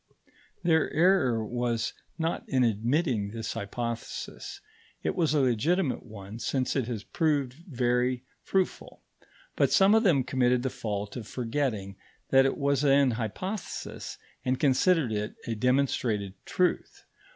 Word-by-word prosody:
Their 160 -2 +3
error 145 - +3
was 120 0 -1 0.2
not 165 0 -1
in 130 -2 +3
admitting 115 - +1
this 115 0 -4
hypothesis; 115 - -5 0.4
it - - -1
was 160 -4 +2
a - - +4
legitimate 135 - +1
one 105 -1 -10
since 130 +1 -1
it 130 -5 0
has 115 -4 -4
proved 145 -5 0
very 125 -5 0 0.2
fruitful. 190 -1 -2 0.5
But - - +2
some 195 +2 +6
of 220 - +5
them 165 - +4
committed 125 -1 +2
the 130 - -1
fault 105 -2 -4
of 115 -4 -6
forgetting 115 -6 -2 0.3
that 135 0 +6
it - - -2
was 140 -1 +1
an 140 -2 +5
hypothesis, 125 - -5 0.3
and 130 0 0
considered 150 0 +3
it 105 0 -2
a 115 - -2
demonstrated 115 -4 +1
truth. 180 -2 0
125 Hz, 135 wpm, -28 LUFS, 115-150 Hz, 0.5 s, some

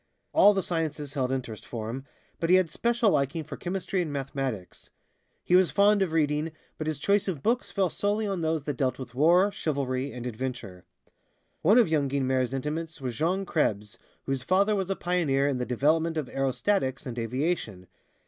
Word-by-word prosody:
All 205 0 +6
the 195 - 0
sciences 155 -4 -3
held 130 -3 0
interest 125 -5 -4
for 110 -3 -6
him, 130 +4 -5 0.3
but 165 - -1
he 185 - +7
had 185 -4 +3
special 235 0 +2
liking 145 +3 0
for - - -8
chemistry 185 0 -2
and 160 -4 -3
mathematics. 135 -8 -4 0.5
He 180 - +3
was 185 -1 +5
fond 205 0 +4
of 190 -4 +1
reading, 155 0 0 0.3
but 155 - -3
his 155 -2 -1
choice 200 +7 +1
of 165 -8 -3
books 240 +2 +1
fell 190 -4 0
solely 205 +2 0
on 195 -4 -2
those 160 -2 0
that 145 -3 -3
dealt 130 -2 0
with 130 -3 -8
war, 175 +9 +4
chivalry 135 -5 -2
and 125 -1 -7
adventure. 120 -6 -5 0.8
One 205 +8 +5
of 240 - +6
young 150 -4 +1
Guynemer's 130 -2 0
intimates 150 +4 -4
was 125 -3 -4
Jean 180 +9 0
Krebs, 105 - -1 0.3
whose 135 -1 -1
father 200 +8 +2
was 190 -2 -2
a 195 - 0
pioneer 155 -7 +1
in 135 -3 -1
the 125 - -2
development 160 +6 +1
of 150 -4 -2
aerostatics 135 +2 0
and 120 -2 -5
aviation. 115 - -2
150 Hz, 185 wpm, -27 LUFS, 130-180 Hz, 0.8 s, he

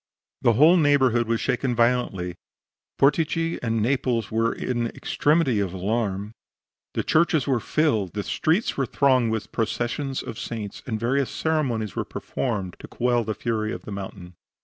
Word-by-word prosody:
The 120 - +4
whole 155 +10 +6
neighborhood 130 -7 +3
was 115 0 +1
shaken 125 0 0
violently; 115 -7 +1 0.6
Portici 165 +3 +2
and 115 -2 0
Naples 120 -4 0
were 115 +1 +2
in 120 -2 -2
the - - -5
extremity 145 -7 +1
of 95 -3 -1
alarm; 100 +1 -2 0.6
the - - 0
churches 160 -4 +2
were 130 -3 +1
filled; 110 - 0
the 105 - -3
streets 165 - 0
were 135 -2 0
thronged 130 -4 +3
with 110 0 -3
processions 120 +4 -2
of 115 - -7
saints, 110 -4 -5
and 110 -3 -2
various 130 +4 +1
ceremonies 130 -10 -1
were - - -1
performed 100 -8 -4
to - - -9
quell 120 -1 +1
the 110 -1 -3
fury 110 -2 -2
of - - -6
the - - -8
mountain. 95 -2 -7
120 Hz, 160 wpm, -24 LUFS, 110-135 Hz, 0.6 s, whole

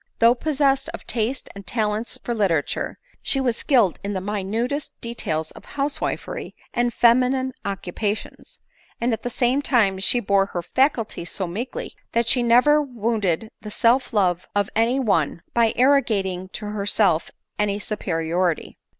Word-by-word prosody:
Though 230 +1 +6
possessed 275 +1 +1
of - - -12
taste 240 +3 -2
and 200 -1 -11
talents 215 +1 -1
for 240 - -2
literature, 190 -9 0 0.2
she 270 - +1
was 250 -3 +1
skilled 235 - +2
in 200 +1 -2
the 190 - -1
minutest 210 +8 -3
details 160 -9 -3
of - - -13
housewifery 285 0 -3 0.2
and 240 0 +1
feminine 255 +3 +3
occupations; 200 +2 -4 0.4
and 235 0 +1
at 225 - -3
the 245 - -3
same 250 +3 +1
time 215 -9 +2
she 240 +5 +3
bore 195 -3 +2
her 175 -3 -4
faculties 230 - 0
so 190 - -2
meekly, 240 - -5 0.2
that 235 0 +2
she 245 - +3
never 250 +6 +5
wounded 225 - -1
the 210 - -7
self 235 +4 +2
love 180 -5 +1
of 205 -1 +1
any 230 +4 +2
one, 170 - +1
by 230 -2 +4
arrogating 210 -9 +2
to 215 - -5
herself 200 -4 +1 0.3
any 205 -1 +1
superiority. 175 -4 -1
225 Hz, 150 wpm, -23 LUFS, 195-250 Hz, 0.4 s, Though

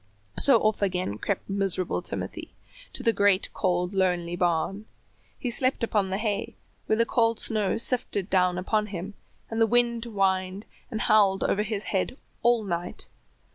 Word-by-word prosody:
So 270 -4 +6
off 215 -1 +1
again 180 - -1
crept 200 - -2
miserable 195 -2 0
Timothy - - -5 0.4
to 260 - -5
the 230 -2 +3
great 200 -2 +2
cold 180 -1 0
lonely 180 -3 +1
barn. 180 +4 0 0.5
He 245 - -3
slept 255 +1 +1
upon 210 -4 +1
the 190 - -1
hay, 210 -1 -2 0.3
where 220 - +2
the 230 - +3
cold 230 -2 +1
snow 215 -3 +1
sifted 230 -5 +1
down 180 -2 +2
upon 210 +3 0
him, 195 0 -6 0.4
and 225 0 -1
the 225 - +5
wind 235 0 +1
whined 195 -2 0 0.2
and 220 - -3
howled 200 -3 +4
over 205 - +1
his 210 -1 -2
head 195 +7 -1 0.2
all 240 -1 +3
night. 175 -2 -4
200 Hz, 160 wpm, -26 LUFS, 185-225 Hz, 0.5 s, So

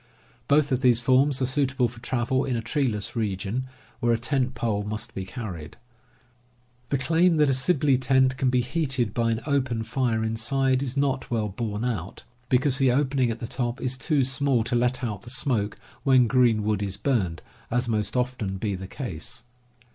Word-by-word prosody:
Both 145 0 +3
of 130 - +2
these 125 -3 +4
forms 130 +2 +3
are - - +3
suitable 130 -1 +1
for 115 0 -12
travel 130 +2 0
in 130 - -1
a 115 - -1
treeless 115 -3 -1
region 110 +3 -2 0.3
where 120 - +2
a 115 - +3
tent 130 +1 -1
pole 115 -4 -1
must 110 +3 -5
be 95 -2 -5
carried. 95 - -7 1.1
The 140 - +1
claim 165 +6 +3
that 150 -2 +4
a - - +3
Sibley 135 0 +3
tent 130 0 +3
can 130 0 +1
be 125 0 +2
heated 130 -5 -1
by 115 -1 +1
an 115 0 -1
open 130 -6 0
fire 115 -1 0
inside 130 +4 +1
is 135 -1 -3
not 135 -1 0
well 110 -3 -1
borne 105 +2 -3
out, 100 -7 -4 0.3
because 130 +2 +2
the 135 -2 +4
opening 135 -1 +1
at 115 - -2
the 115 - -4
top 120 +1 -3
is 130 0 -1
too 140 +1 +1
small 135 -2 +1
to 120 - -1
let 125 +2 +1
out 105 -5 -3
the 120 - -10
smoke 120 -5 -1 0.2
when 130 -1 +5
green 120 -3 +3
wood 105 -1 0
is 100 -2 -3
burned, 100 -12 -1 0.3
as 125 +1 0
must 110 +1 -1
often 125 -6 -1
be 100 +1 -2
the 95 0 -6
case. 110 - -6
125 Hz, 190 wpm, -25 LUFS, 110-135 Hz, 1.1 s, when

